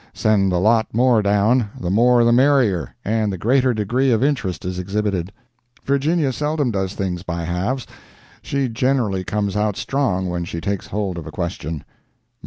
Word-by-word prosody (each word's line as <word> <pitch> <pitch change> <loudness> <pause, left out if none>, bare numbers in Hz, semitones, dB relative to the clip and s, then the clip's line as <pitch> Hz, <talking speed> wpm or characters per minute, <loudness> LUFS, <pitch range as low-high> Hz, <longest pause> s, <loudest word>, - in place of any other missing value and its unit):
Send 100 -3 +2
a 90 - +1
lot 110 +4 +3
more 120 -2 +4
down—the 105 -1 +1
more 120 +3 +4
the 120 - +4
merrier, 125 - +2
and 110 0 0
the 95 - -4
greater 130 +7 +2
degree 120 +5 0
of 120 0 +2
interest 115 - -1
is 90 0 -3
exhibited. 95 -1 -2 0.5
Virginia 140 +1 +1
seldom 150 -2 -1
does 95 -1 -2
things 90 -3 -3
by 85 -2 -4
halves—she 125 +7 -4
generally 115 -6 0
comes 100 0 -2
out 105 -1 0
strong 100 -10 -1
when 90 -1 -2
she 85 0 -5
takes 100 +2 -3
hold 100 -4 -3
of 85 - -9
a - - -7
question. 85 -3 -4
105 Hz, 160 wpm, -20 LUFS, 95-125 Hz, 0.5 s, more